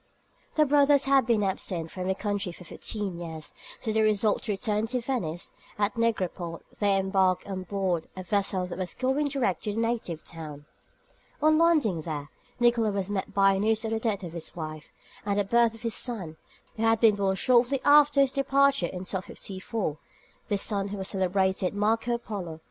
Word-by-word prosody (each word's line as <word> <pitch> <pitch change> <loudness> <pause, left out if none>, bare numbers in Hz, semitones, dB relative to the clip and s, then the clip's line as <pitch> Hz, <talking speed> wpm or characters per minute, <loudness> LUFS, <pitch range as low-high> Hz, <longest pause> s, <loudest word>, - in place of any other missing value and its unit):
The 305 - +5
brothers 285 -1 +4
had 270 -3 +4
been 225 -3 +3
absent 180 -4 -2
from 185 -1 -5
their 190 - +1
country 205 -2 -2
for 175 - -12
fifteen 195 0 -5
years, 160 -3 -7 0.3
so 220 - -2
they 220 0 +2
resolved 215 0 +2
to 215 - -1
return 210 +2 -1
to 250 +2 -1
Venice, 210 -10 -3 0.3
and 205 - +3
at - - -28
Negropont 185 -7 -1 0.2
they 200 -2 +3
embarked 190 -1 +2
on 190 -2 -4
board 185 -3 -1
a 185 - -5
vessel 195 -1 0
that 180 +1 -7
was 185 -1 -4
going 265 +3 +1
direct 260 -10 0
to 210 - -1
their 220 - -2
native 225 -8 -2
town. 150 -3 -9 0.7
On 310 +1 +4
landing 300 - +3
there, 150 -2 -5 0.3
Nicolo 240 -2 +3
was 200 -1 -2
met 195 -2 -2
by 195 -1 +4
news 220 +2 +1
of 220 - -2
the 225 - 0
death 215 -4 -1
of 170 -2 -6
his 170 -2 -6
wife, 155 -2 -7 0.3
and 205 0 0
of 205 - +1
the - - -28
birth 235 -1 +4
of 225 - -15
his 230 -1 -1
son, 195 -11 -3 0.4
who - - -4
had 225 0 +3
been 225 -2 +6
born 195 -1 +1
shortly 250 +5 +3
after 290 -1 +6
his 270 -2 +3
departure 275 -6 +2
in 180 - -6
1254; 190 -2 -4 0.5
this 205 -3 0
son 200 -2 0
was - - -4
the 195 - -3
celebrated 190 0 +1
Marco 225 +3 +1
Polo. 185 -9 -6
205 Hz, 195 wpm, -27 LUFS, 185-235 Hz, 0.7 s, been